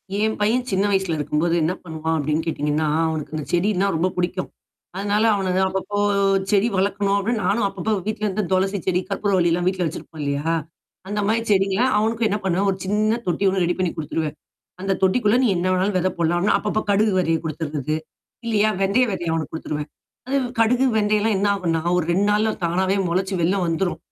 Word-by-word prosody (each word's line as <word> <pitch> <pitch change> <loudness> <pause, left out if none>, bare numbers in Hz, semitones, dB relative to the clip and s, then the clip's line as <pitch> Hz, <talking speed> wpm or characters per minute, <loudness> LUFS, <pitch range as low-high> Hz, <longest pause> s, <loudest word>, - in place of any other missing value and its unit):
என் 220 +2 +1
பையன் 240 +4 +1
சின்ன 190 0 +2
வயசுல 190 -4 +1
இருக்கும்போது 150 +3 0
என்ன 160 +2 +1
பண்ணுவான்? 160 -1 -2
அப்டீன்னு 155 +2 0
கேட்டீங்கன்னா, 150 -1 -1 0.2
அவனுக்கு 155 -1 -4
இந்தச் 155 -2 -5
செடின்னா 195 +2 +2
ரொம்ப 165 +3 +1
புடிக்கும். 180 +1 -1 0.5
அதனால, 205 +2 0
அவன 190 -2 -1
நான் 190 0 +3
அப்பப்போ 190 +2 -3 0.5
செடி 205 +2 +3
வளக்கணும், 200 +1 +1
அப்டீன்னு 225 +2 -1
நானும் 205 0 +2
அப்பப்போ 195 +2 -3
வீட்டிலிருந்து 215 -1 -1
துளசிச்செடி, 185 -1 +1
கற்பூரவள்ளி 190 -4 +1
எல்லாம் 175 +1 0
வீட்ல 185 -1 0
வச்சிருப்போம் 155 0 -8
இல்லையா? 145 +3 -1 0.5
அந்த 210 +1 -2
மாரி 225 +2 +2
செடிங்கலாம் 200 +5 +2
அவனுக்கும் 225 +2 +1
என்னா 210 +1 -1
பண்ணுவேன், 190 +2 +1
ஒரு 190 - -4
சின்ன 215 +4 +1
தொட்டி 175 +2 0
ஒண்ணு 190 -1 +1
ரெடி 175 - 0
பண்ணிக் 180 -2 -1
குடுத்துருவேன். 155 0 -3 0.5
அந்தத் 195 0 -1
தொட்டிக்குள்ள 210 +3 +3
நீ - - +4
என்னா 180 +2 0
வேண்ணாலும் 185 +2 0
வெதை 185 +1 +1
போடலாம் 170 0 +1
அப்டீன்னு, 200 - +3
அப்பப்ப 215 +1 -1
கடுகு 205 0 +3
விதையை 165 -3 +1
கொடுத்துர்றது. 155 -1 -3 0.5
இல்லையா, 215 -2 +2
வெந்தயம் 220 +5 +2
வெதய 175 -3 -2
அவனுக்கு 160 -1 -2
குடுத்துருவேன். 150 -1 -4 0.4
அது 270 +2 0 0.2
கடுகு, 245 +3 +3
வெந்தயம் 210 0 +2
எல்லாம் 220 -1 +2
என்னாகும்ன்னா, 190 -5 0 0.2
ஒரு 175 - 0
2 195 +4 +2
நாள்ல 215 +1 +2
தானாவே 185 +3 +1
மொளச்சு 190 +3 -1
வெளில 180 +4 +2
வந்துரும். 170 +2 -1
190 Hz, 180 wpm, -22 LUFS, 165-210 Hz, 0.5 s, நீ